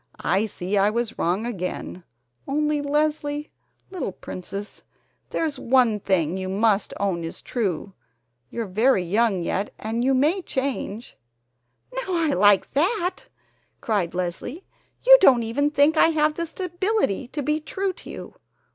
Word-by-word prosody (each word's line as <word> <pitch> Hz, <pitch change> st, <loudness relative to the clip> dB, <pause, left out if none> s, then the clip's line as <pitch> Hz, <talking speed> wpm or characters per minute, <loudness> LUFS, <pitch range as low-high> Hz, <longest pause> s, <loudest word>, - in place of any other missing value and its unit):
"I 205 Hz, +3 st, +1 dB
see 190 Hz, 0 st, -3 dB
I 200 Hz, +1 st, +4 dB
was 235 Hz, +1 st, -3 dB
wrong 185 Hz, +7 st, 0 dB
again, 185 Hz, -4 st, -5 dB, 0.4 s
only, 300 Hz, +1 st, 0 dB
Leslie, 295 Hz, 0 st, -1 dB, 0.4 s
little 320 Hz, -, -4 dB
princess, 195 Hz, +4 st, -8 dB, 0.5 s
there's 305 Hz, -4 st, -2 dB
one 240 Hz, -4 st, +3 dB
thing 185 Hz, -3 st, 0 dB
you 185 Hz, 0 st, -4 dB
must 205 Hz, +1 st, +1 dB
own 190 Hz, -4 st, -1 dB
is 165 Hz, -, -6 dB
true, 200 Hz, -5 st, -3 dB, 0.6 s
you're 230 Hz, -, -4 dB
very 215 Hz, +1 st, +2 dB
young 200 Hz, 0 st, +1 dB
yet 195 Hz, +4 st, -2 dB
and 225 Hz, +2 st, -2 dB
you 265 Hz, +1 st, +3 dB
may 310 Hz, +9 st, +2 dB
change 260 Hz, -, -4 dB, 0.4 s
" 125 Hz, -, -31 dB
"Now, -, -, -2 dB
I 325 Hz, -3 st, +1 dB
like 205 Hz, +1 st, +4 dB
that!" 360 Hz, +5 st, 0 dB, 0.5 s
cried 195 Hz, -7 st, -1 dB
Leslie. 185 Hz, -, -4 dB, 0.4 s
"You -, -, +10 dB
don't 255 Hz, -10 st, +6 dB
even 275 Hz, +6 st, 0 dB
think 295 Hz, +2 st, +3 dB
I -, -, +6 dB
have 305 Hz, -1 st, +2 dB
the 335 Hz, +1 st, -3 dB
stability 360 Hz, -, -1 dB
to 290 Hz, +3 st, -4 dB
be 300 Hz, +3 st, 0 dB
true 380 Hz, +5 st, -3 dB
to -, -, -13 dB
you. -, -, -8 dB
240 Hz, 145 wpm, -24 LUFS, 195-305 Hz, 0.6 s, You